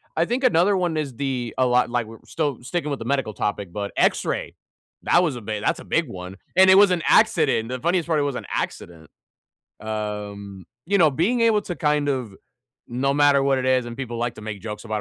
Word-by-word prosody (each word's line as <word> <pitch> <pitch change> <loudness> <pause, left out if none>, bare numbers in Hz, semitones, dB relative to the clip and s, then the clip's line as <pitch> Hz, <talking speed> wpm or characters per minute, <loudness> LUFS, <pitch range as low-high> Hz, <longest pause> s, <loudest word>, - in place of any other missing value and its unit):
I 165 - +2
think 245 +7 -2
another 200 -4 +3
one 175 -3 -1
is 140 -5 -3
the 125 -3 -3
a 130 - +3
lot 125 -1 +2
like, 120 -1 -1
we're 115 0 -12
still 145 -6 -3
sticking 150 +2 -3
with 140 - -3
the 115 - -7
medical 135 -4 -1
topic, 100 -3 -3
but 100 -1 -4
X-ray. - - 0 0.5
That 175 - +4
was 155 -7 -1
a 120 - -7
big 105 -1 -4
that's - - 0
a - - -11
big - - 0
one. 90 +1 -8 0.2
And 190 +1 +6
it 190 - +8
was 200 -1 +6
an 175 -3 0
accident. 115 +1 +3
The 130 0 -4
funniest 170 +3 0
part, 160 -2 +1
it - - +1
was 140 -3 -2
an - - -6
accident. 80 -3 -5 0.7
Um, 105 -3 -6 0.2
you 200 +3 +2
know, 160 -4 +5
being 190 - 0
able 225 -2 +3
to 175 -4 -6
kind 150 -2 +1
of 125 -7 -2 0.5
no 135 +3 0
matter 145 -1 +4
what 135 -1 +2
it 130 - -3
is, 130 -1 +2
and 120 0 -7
people 120 -3 -5
like 120 -1 -2
to - - -11
make 105 -2 -6
jokes 105 +1 -7
about 110 -1 -3
130 Hz, 230 wpm, -23 LUFS, 110-160 Hz, 0.7 s, it